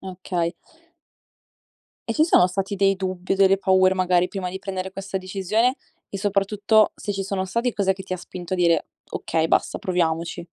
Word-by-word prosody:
Okay. 180 -2 -3 1.5
E - - +1
ci 310 - +3
sono 180 - +5
stati 195 +2 -3
dei 195 0 +3
dubbi 185 -1 -3
o - - +1
delle 195 0 +4
paure 190 -1 +4
magari, 180 -1 +2
prima 185 -2 -4
di 190 - -5
prendere 190 -1 -5
questa 195 0 -5
decisione, 200 +7 0 0.3
e 195 - -6
soprattutto 205 +2 +2
se 205 - -4
ci 195 0 -3
sono 195 -1 -2
stati, 235 +6 -1
cos'è 195 -2 +1
che 190 - -9
ti 185 - -7
ha - - -1
spinto 180 0 -6
a - - -2
dire: 170 -2 +2 0.2
"Okay, 160 -1 -1
basta, - - +1
proviamoci"? 170 -1 -1
190 Hz, 180 wpm, -23 LUFS, 180-195 Hz, 1.5 s, sono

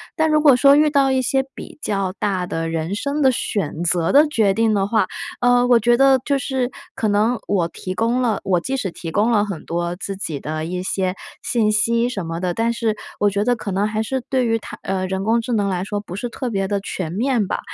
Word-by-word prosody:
但 315 -1 +2
如 305 - +4
果 290 -4 +7
说 275 +2 +6
遇 300 +1 +4
到 275 -2 +3
一 260 0 +2
些 265 +2 +1
比 - - -10
较 195 -6 -1
大 190 -3 -1
的 165 -1 -3
人 165 +4 -2
生 280 +6 -2
的 265 -2 +5
选 175 -8 -2
择 170 -1 +1
的 290 +3 +6
决 220 -9 +2
定 220 +1 +2
的 195 -1 +1
话， 220 +1 +2 0.4
呃， 245 0 +4
我 240 -2 +5
觉 240 +2 +3
得 270 0 +5
就 280 -1 +1
是 260 -1 -2 0.2
可 220 - -1
能 215 +4 +2
我 180 -5 +1
提 185 +2 -6
供 230 +5 0
了 235 -5 +1
我 180 -3 +2
即 265 +10 -3
使 230 -8 -2
提 170 -1 -7
供 210 +7 +2
了 210 -3 +3
很 195 -6 -6
多 175 +1 -2
自 195 +1 -5
己 155 -7 -4
的 155 +2 -4
一 180 +1 -3
些 185 0 -1 0.3
信 225 -4 +1
息 230 +3 +2
什 195 -7 -4
么 165 +1 -4
的， 180 0 -1
但 230 +1 +1
是 225 -2 -1 0.2
我 205 - +3
觉 200 +2 -1
得 245 - +3
可 220 -3 -6
能 200 +3 +1
还 215 0 -2
是 260 +4 -2
对 255 -2 +1
于 225 0 +2
它 - - -9
呃， 190 -1 -2
人 190 +1 -3
工 225 +2 +2
智 235 +1 -3
能 205 -3 +1
来 180 -1 -1
说 205 +1 -3
不 180 -3 -8
是 240 +4 -4
特 255 +1 -4
别 195 -3 -1
地 200 0 -1
全 180 -4 -4
面 235 +1 +1
吧。 - - -2
215 Hz, 265 characters per minute, -20 LUFS, 190-245 Hz, 0.4 s, 果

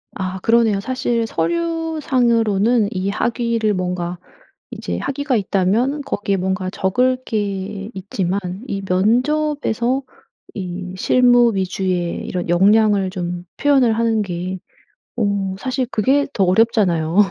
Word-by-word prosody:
아 190 0 -4
그러네요. 225 -3 +3
사실 240 -1 -1
서류상으로는 250 - +1
이 190 +1 -2
학위를 230 0 0
뭔가 180 -1 -3 0.5
이제 - - -5
학위가 275 -2 -1
있다면 210 +9 +1
거기에 205 -7 -2
뭔가 185 0 -2
적을 250 +8 +1
게 200 -1 -3
있지만 190 0 -2 0.3
이 195 -4 -3
면접에서 255 +4 +1 0.5
이 185 -1 -5
실무 245 +1 +4
위주의 185 -2 -2
이런 180 -2 -3
역량을 200 +2 +4
좀 175 -2 -5
표현을 270 -5 +3
하는 225 -1 +1
게 185 -1 -4 0.6
어 200 -2 0
사실 260 +2 -1
그게 270 +7 +2
더 195 - +2
어렵잖아요. 185 -5 +2
210 Hz, 250 characters per minute, -19 LUFS, 185-245 Hz, 0.6 s, 실무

